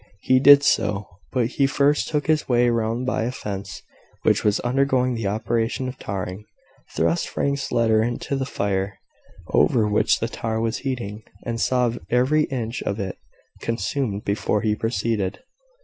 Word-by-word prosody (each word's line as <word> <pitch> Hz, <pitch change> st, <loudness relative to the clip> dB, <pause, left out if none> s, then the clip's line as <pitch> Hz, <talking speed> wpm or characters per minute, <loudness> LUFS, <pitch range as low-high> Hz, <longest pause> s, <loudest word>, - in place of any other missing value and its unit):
He 130 Hz, 0 st, +4 dB
did 140 Hz, +1 st, +8 dB
so: 105 Hz, -6 st, +1 dB, 0.3 s
but 125 Hz, -3 st, +1 dB
he 135 Hz, +3 st, +1 dB
first 145 Hz, +1 st, +2 dB
took 150 Hz, -2 st, -1 dB
his 155 Hz, -3 st, +1 dB
way 120 Hz, -1 st, +4 dB
round 115 Hz, +2 st, -1 dB
by 130 Hz, -, 0 dB
a 115 Hz, +2 st, -1 dB
fence 100 Hz, -5 st, -6 dB, 0.4 s
which -, -, +3 dB
was 105 Hz, 0 st, +2 dB
undergoing 130 Hz, 0 st, +1 dB
the 115 Hz, -4 st, -2 dB
operation 115 Hz, +4 st, -1 dB
of 130 Hz, +1 st, -7 dB
tarring, 95 Hz, +1 st, -5 dB, 0.5 s
thrust 170 Hz, -, +1 dB
Frank's 140 Hz, 0 st, -2 dB
letter 115 Hz, -2 st, +3 dB
into 120 Hz, +4 st, -2 dB
the 135 Hz, -1 st, -2 dB
fire 100 Hz, -4 st, -2 dB, 0.5 s
over 110 Hz, -3 st, +3 dB
which 105 Hz, 0 st, +2 dB
the 115 Hz, -, -1 dB
tar 115 Hz, -1 st, -3 dB
was 115 Hz, 0 st, -1 dB
heating, 120 Hz, -6 st, -4 dB, 0.2 s
and 115 Hz, 0 st, -2 dB
saw 125 Hz, -2 st, +2 dB, 0.2 s
every 130 Hz, +6 st, +3 dB
inch 120 Hz, -2 st, -4 dB
of 100 Hz, +2 st, -3 dB
it 95 Hz, -2 st, -4 dB, 0.4 s
consumed 115 Hz, -2 st, -2 dB
before 105 Hz, +1 st, 0 dB
he 110 Hz, -2 st, +1 dB
proceeded. 110 Hz, -, -2 dB
115 Hz, 160 wpm, -23 LUFS, 105-130 Hz, 0.5 s, did